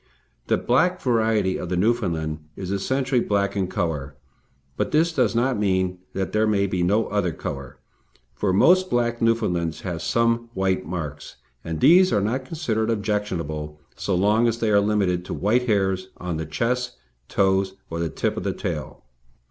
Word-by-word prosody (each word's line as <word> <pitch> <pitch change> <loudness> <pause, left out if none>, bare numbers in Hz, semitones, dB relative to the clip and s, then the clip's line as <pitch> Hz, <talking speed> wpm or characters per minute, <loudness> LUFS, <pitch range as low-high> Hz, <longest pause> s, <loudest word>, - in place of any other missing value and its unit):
The - - +3
black 180 +9 +2
variety 110 - +1
of 90 - -5
the 90 - -1
Newfoundland 90 -8 0 0.2
is 95 -1 -5
essentially 130 +5 0
black 100 -2 0
in 95 -2 0
colour; 75 -6 -3 0.6
but - - -1
this 160 +2 +2
does 125 -5 +1
not 120 -1 +1
mean 95 -2 0
that 95 -1 -2
there 110 0 +2
may 100 -2 +2
be 95 -2 -1
no 100 +6 +2
other 100 -4 0
colour, 70 -3 -6 0.6
for 95 +10 0
most 185 - +4
black 120 -1 0
Newfoundlands 90 -8 0
have 85 -3 -4
some 115 +4 +1
white 95 -4 0
marks, 75 -4 -5 0.3
and 80 -1 -4
these 185 +3 +6
are 105 - +3
not 120 +6 -1
considered 115 -8 -1
objectionable, 90 -9 -2 0.2
so 100 - -1
long 105 +5 +3
as 115 0 0
they 115 -2 0
are 100 - +5
limited 100 -4 +1
to - - -4
white 120 +5 +1
hairs 95 -3 +1
on 90 -2 -4
the 80 -1 -4
chest, 125 +10 -1 0.3
toes, 95 0 +1 0.2
or 85 - -3
the 85 -1 -1
tip - - -1
of - - -3
the - - -1
tail. - - -5
100 Hz, 170 wpm, -23 LUFS, 90-115 Hz, 0.6 s, these